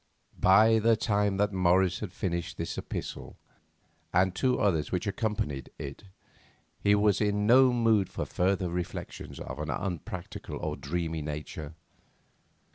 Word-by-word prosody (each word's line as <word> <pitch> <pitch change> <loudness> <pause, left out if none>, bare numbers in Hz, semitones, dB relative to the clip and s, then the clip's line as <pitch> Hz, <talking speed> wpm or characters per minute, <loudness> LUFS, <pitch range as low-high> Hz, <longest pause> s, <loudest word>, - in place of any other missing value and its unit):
By 110 +4 +6
the 115 +1 +4
time 105 -3 +1
that 105 0 +1
Morris 90 0 +3
had 105 -5 -5
finished 85 -3 -3
this - - -3
epistle, - - -6 0.7
and 90 +1 +3
two 125 +6 +1
others 85 -7 +1
which 90 - -1
accompanied 100 - -2
it, 70 +8 -8 0.7
he 100 0 +4
was 105 -1 +3
in 105 0 +1
no 130 +3 +6
mood 115 -5 +2
for - - -4
further 95 -1 0
reflections 90 0 -5
of 65 +3 -7
an 75 0 -4
unpractical 85 +4 -5
or - - -3
dreamy 80 +1 -3
nature. 75 +1 -6
95 Hz, 135 wpm, -29 LUFS, 85-105 Hz, 0.7 s, By